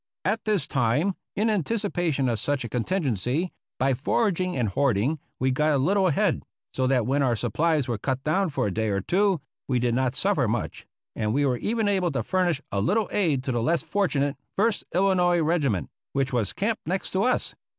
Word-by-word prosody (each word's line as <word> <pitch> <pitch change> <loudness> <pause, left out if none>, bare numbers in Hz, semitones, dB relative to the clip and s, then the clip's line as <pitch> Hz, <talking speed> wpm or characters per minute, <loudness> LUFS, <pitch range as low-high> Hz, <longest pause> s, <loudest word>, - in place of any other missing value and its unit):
At 215 +4 0
this 205 -9 +1
time, 135 - +1 0.2
in 215 +3 +1
anticipation 180 - 0
of 115 -3 0
such 145 -2 -1
a 115 - -5
contingency, 130 - -1 0.3
by 135 +1 +2
foraging 185 - 0
and 120 -4 +1
hoarding 130 - +1 0.2
we 130 +1 +1
got 150 +4 +2
a - - +3
little 190 +8 +2
ahead, 160 - +1 0.3
so 130 -1 0
that 130 -4 +2
when 140 +3 +1
our 125 -4 +2
supplies 155 +4 0
were 115 -3 -2
cut 130 +3 -2
down 185 +5 +1
for 145 - -1
a 100 - -1
day 110 +1 0
or 100 -1 0
two 190 - +1 0.3
we 130 - +1
did 120 -1 +1
not 130 0 0
suffer - - +2
much, - - -3 0.3
and 105 +2 -1
were 140 -3 +2
even 220 - 0
able 190 -4 +1
to 135 - -1
fur 185 -1 +1
nish 160 -4 -1
a 100 - 0
little 210 - +1
aid 155 -10 +1
to 130 - -2
the 120 -2 0
less 165 +7 +1
fortunate 155 -5 0 0.2
First 215 +2 +1
Illinois 180 -1 +3
Regiment, 145 - 0 0.2
which 135 -1 0
was 115 -6 0
camped 215 -1 -2
next 185 +3 -2
to 190 - 0
us. 250 +4 +1
150 Hz, 200 wpm, -26 LUFS, 125-190 Hz, 0.3 s, a